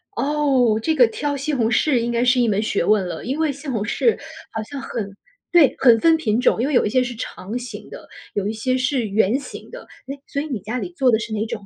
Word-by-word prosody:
哦， 270 -6 +2
这 320 - +1
个 250 -5 +6
挑 285 +6 -3
西 280 +2 -3
红 235 -5 +1
柿 280 +1 +2
应 235 0 -1
该 235 0 +1
是 250 0 +3
一 240 - +3
门 210 -1 +1
学 215 - 0
问 210 -3 +2
了。 - - -6
因 270 +5 -3
为 320 -2 +1
西 280 +2 -11
红 235 -6 -2
柿 440 - +1 0.3
好 220 - -4
像 280 +6 -8
很 200 -6 -5 0.4
对， 335 -6 +5
很 240 -4 +6
分 325 +6 +5
品 230 -7 0
种。 250 - +2
因 260 - +1
为 300 - -2
有 245 - +4
一 - - 0
些 255 +3 +2
是 245 -1 -5
长 215 0 -6
形 250 0 -8
的， - - -11 0.3
有 200 -1 -1
一 215 - -2
些 255 +4 -1
是 255 -2 0
圆 215 +4 +2
形 - - -10
的， - - -10 0.2
诶， 275 +1 -6
所 280 - -3
以 - - -5
你 260 -8 -3
家 215 +6 -5
里 350 - -5
做 265 -5 +3
的 220 - +3
是 220 0 -5
哪 215 0 -1
种？ 220 -3 -6
245 Hz, 285 characters per minute, -21 LUFS, 220-280 Hz, 0.4 s, 个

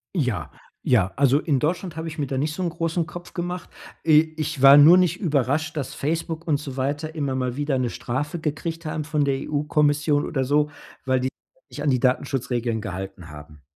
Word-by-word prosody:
Ja, 110 - -1 0.3
ja. 95 -7 +2
Also, 140 0 +4
in 145 -4 0
Deutschland 170 +4 -2
habe 160 0 -5
ich 160 0 -7
mir 145 - -1
da 130 - -3
nicht 150 +3 -1
so 185 - -3
'n 175 - 0
großen 165 0 -1
Kopf 175 +1 -10
gemacht. 175 0 -4 0.4
I 155 0 +4
ich 150 -3 -3
war 135 +1 +9
nur 155 +5 +9
nicht 180 -1 +2
überrascht, 155 - 0
dass 140 -4 -3
Facebook 165 +2 -3
und 150 -3 +2
so 140 -3 -8
weiter 145 +4 -2
immer 140 -4 -2
mal 125 -1 -2
wieder 145 -2 0
'ne 125 -2 0
Strafe 150 +7 -3
gekriegt 160 +2 -4
haben 155 0 -3
von 150 -1 0
der 140 -1 +1
EU-Kommission 150 0 +1
oder 135 -4 -1
so, 150 +3 +1 0.3
weil 130 -1 +2
die 130 +1 -1 0.4
sich - - -11
nicht 145 - -4
an 150 - +2
die 130 - +2
Datenschutzregeln 125 -3 0
gehalten 95 -3 -7
haben. 75 0 -12
145 Hz, 205 wpm, -24 LUFS, 130-160 Hz, 0.4 s, war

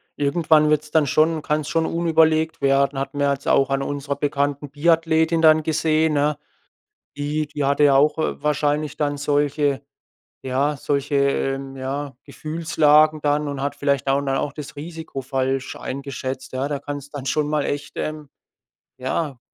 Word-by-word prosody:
irgendwann 155 +1 +3
wird's 150 0 +1
dann 155 -2 +3
schon 155 +4 +2
kann's 150 0 -1
schon 165 -1 +1
unüberlegt 160 -2 +2
werden. 140 0 +2
Hatten 140 +1 -4
wir 145 - +2
ja 140 - +3
jetzt 140 - -8
auch 135 0 +3
an 135 0 0
unserer 140 0 -3
bekannten 145 0 -1
Biathletin 160 +2 +2
dann 155 0 +6
gesehen, 160 0 +1
ne? 145 0 +1 0.8
Die 150 +1 -2
die 145 -1 -4
hatte 140 +1 +3
ja 140 -1 +5
auch, 150 +3 +4
äh, 155 - -2
wahrscheinlich 150 0 0
dann 145 -1 -1
solche 145 -1 0 0.7
ja, 140 +3 0
solche, 140 +1 -2
ähm, 135 -1 0
ja, 135 +1 -4
Gefühlslagen 155 -1 +2
dann 145 0 +1
und 140 -1 -4
hat 140 - -2
vielleicht 140 -2 0
au 135 +1 +3
ne, 135 -1 -1
auch 145 - -2
das 150 0 -9
Risiko 160 -2 -7
falsch 135 0 -2
eingeschätzt, 130 -1 -6
ja. 135 +2 -1
Da 145 - -2
kann's 145 -1 -6
dann 140 -3 -7
schon 150 +1 0
mal 150 -1 0
echt, 145 0 -4
ähm, 155 -1 -4 0.7
ja 130 +1 -3
145 Hz, 165 wpm, -22 LUFS, 140-155 Hz, 0.8 s, dann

